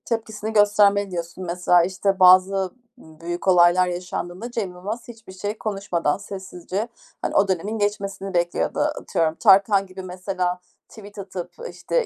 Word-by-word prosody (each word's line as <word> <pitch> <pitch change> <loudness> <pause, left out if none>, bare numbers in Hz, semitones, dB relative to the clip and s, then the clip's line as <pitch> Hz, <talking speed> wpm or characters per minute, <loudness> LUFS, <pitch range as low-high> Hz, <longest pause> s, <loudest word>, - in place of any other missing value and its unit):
Tepkisini 220 -1 -3
göstermeli 205 -1 +4
diyorsun. 170 +1 -5
Mesela, 175 0 +3
işte, 190 +2 -1
bazı 185 +1 +5 0.3
büyük 170 -1 -7
olaylar 180 0 +5
yaşandığında 180 +4 -5
Cem 220 -6 -3
Yılmaz 205 +6 -6
hiçbir 225 -5 -12
şey 205 +3 -4
konuşmadan, 195 -8 -1
sessizce, 195 +1 -5 0.3
hani, - - -3
o 200 - +4
dönemin 195 +4 -2
geçmesini 200 -2 -3
bekliyordu. 175 0 0
Atıyorum, 160 -1 0
Tarkan 195 +2 +5
gibi, 190 0 -9
mesela 180 0 -3 0.3
tweet 205 -2 -13
atıp, 190 -2 -6 0.2
işte, - - -1
190 Hz, 135 wpm, -23 LUFS, 180-205 Hz, 0.3 s, bazı